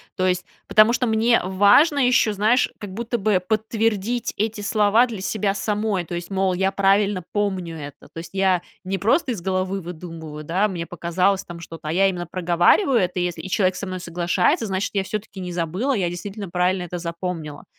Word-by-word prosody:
То 185 - 0
есть. 180 -1 0 0.2
Потому 215 +2 +5
что 250 0 +1
мне 225 +2 +3
важно 205 - +5
еще, 245 -3 +3
знаешь, 215 +5 +2
как 205 -2 -7
будто 235 +3 -2
бы 200 -3 +1
подтвердить 220 +2 -1
эти 215 0 -1
слова 215 +3 +3
для 225 -5 -6
себя 195 0 -1
самой. 210 -3 -1
То 170 - -8
есть, 175 0 -5
мол, 190 -1 +1
я 190 +2 +1
правильно 195 -1 +2
помню 190 -5 -1
это, 145 -2 -9
то - - -12
есть 170 +3 -10
я 190 -2 +2 0.2
не 190 +1 -3
просто 260 - +2
из 215 -7 -4
головы 190 +1 -1
выдумываю, 160 -3 -8
да? 185 +7 +1
Мне 175 -4 -4
показалось 180 +3 0
там 175 -1 -9
что-то, 165 -2 -9
а - - -1
я 195 +4 +4
именно 175 -3 -3
проговариваю 180 - +3
это, 180 -1 -1
и - - +1
если 175 -1 -3
и 190 - -7
человек 185 -1 +2
со 195 +2 -5
мной 185 0 -4
соглашается, 180 +4 0
значит, 195 +1 -2
я 195 -2 +1
всё-таки 210 0 -6
не 180 -1 -5
забыла, 180 - -1
я 195 -7 0
действительно 195 +3 -6
правильно 180 +1 +1
это 175 0 -5
запомнила. 170 -3 -5
190 Hz, 200 wpm, -22 LUFS, 175-210 Hz, 0.2 s, Потому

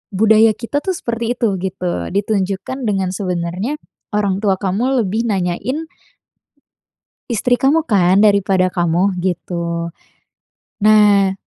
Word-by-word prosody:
budaya 220 +1 +4
kita 245 +5 -3
tuh 375 +4 -3
seperti 235 -4 -3
itu 235 - 0
gitu, 180 -1 -3
ditunjukkan 200 +3 -2
dengan 190 -3 0
sebenarnya 185 - -3 0.4
orang 200 -2 0
tua 200 -2 +1
kamu 225 +7 0
lebih 220 +4 -2
nanyain 200 - -2 1.5
istri 245 +2 +2
kamu 300 +6 +1
kan, 190 -2 +3
daripada 200 -3 +3
kamu 180 +2 0
gitu. 170 -2 -3 1.0
Nah 205 -2 +5
200 Hz, 110 wpm, -17 LUFS, 185-225 Hz, 1.5 s, Nah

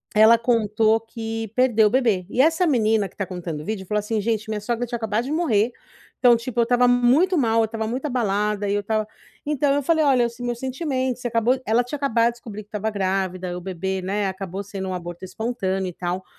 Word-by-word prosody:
ela 220 +2 +7
contou 225 -1 +2
que 225 -1 -5
perdeu 240 -4 +4
o - - +1
bebê. 225 -8 +2
E, 250 - +2
essa 325 +5 +3
menina 220 -7 +2
que - - -27
tá 195 - -2
contando 175 -5 -5
o - - -10
vídeo 205 -2 -4
falou 210 +2 0
assim: 210 +1 -2
"Gente 220 0 -1
minha 215 -1 -2
sogra 235 +3 -2
tinha 240 - -4
acabado 220 0 -1
de 275 - -4
morrer, 245 -9 +2 0.5
então, 245 -2 +6
tipo, 235 +1 -4
eu - - +6
estava 245 +1 +3
muito 250 +10 +4
mal, 230 -5 +2
eu - - +3
estava 220 0 -4
muito 255 +6 -3
abalada 210 -4 0
e - - +1
eu 205 - 0
estava" 215 +1 -1 0.4
Então 290 -1 +1
eu 285 - +1
falei: 320 +2 +2
"Olha 255 -4 +4
o - - -6
se 235 +1 -10
meus 240 -1 -3
sentimentos, 260 -2 -2
você 245 - -2
acabou" 235 +3 +1
ela 225 +3 +2
tinha 245 +5 -5
acabado 235 -5 +2
a - - +1
descobrir 225 -3 -9
que 205 - -32
estava 215 +1 -2
grávida 190 -2 -2
e 175 - -4
o 180 - -6
bebê, 190 +1 -3
né, 200 +2 -1
acabou 190 0 -5
sendo 195 -1 -6
um - - -3
aborto 175 0 -6
espontâneo 190 -2 -2
e - - -9
tal. 180 +2 -3
225 Hz, 240 wpm, -23 LUFS, 200-245 Hz, 0.5 s, ela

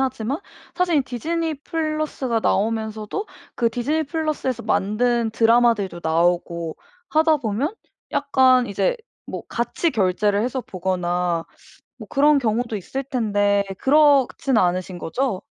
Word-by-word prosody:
하지만 265 +1 -1 0.4
사실 345 -5 +2
디즈니 320 +6 -2
플러스가 310 -5 -2
나오면서도 220 - -1 0.3
그 235 - +2
디즈니 265 +7 -1
플러스에서 295 -6 -2
만든 230 +3 +1
드라마들도 225 -5 +3
나오고 170 0 0 0.3
하다 315 0 +4
보면 250 - -2 0.4
약간 260 -3 +4
이제 - - 0 0.3
뭐 - - -6
같이 240 +8 -1
결제를 205 - +1
해서 255 +2 -2
보거나 180 -5 -1 0.5
뭐 - - -11
그런 290 +1 +4
경우도 230 -2 -1
있을 265 +8 -4
텐데 205 -6 +1
그렇진 280 -2 +3
않으신 180 0 0
거죠? 205 +3 -2
235 Hz, 280 characters per minute, -22 LUFS, 200-280 Hz, 0.5 s, 하다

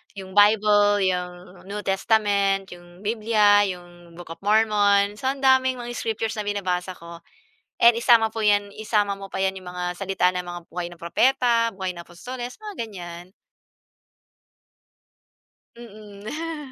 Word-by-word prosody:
yung 190 -1 -9
Bible, 205 0 +4
yung 180 0 -4
New 205 +1 -5
Testament, 195 -1 +1
yung 175 +1 -14
Biblia, 210 -2 +3
yung 175 -2 -10
Book 175 -1 -11
of 165 - -9
Mormon, 205 -1 +2
so 260 - -3
ang 270 +1 -2
daming 260 -1 +4
mga 240 -1 -7
scriptures 225 -1 -3
na 210 - -4
binabasa 185 -3 -2
ko 170 0 -11 0.6
and 235 0 +6
isama 230 -2 +4
po 225 - -4
'yan 205 -1 +2
isama 210 -2 +1
mo 195 0 -8
pa 190 - -2
'yan, 190 - +1
yung 180 - -11
mga 180 0 -4
salita 185 0 0
ng 180 - -2
mga 175 -1 -7
buhay 175 0 -4
ng 175 - -13
propeta, 235 +6 +2
buhay 190 -1 -3
ng 175 - -10
apostoles, 245 +9 -8
mga 425 -1 -9
ganyan. 175 -2 -10 2.5
Mm. 235 +8 -8
205 Hz, 145 wpm, -23 LUFS, 180-225 Hz, 2.5 s, and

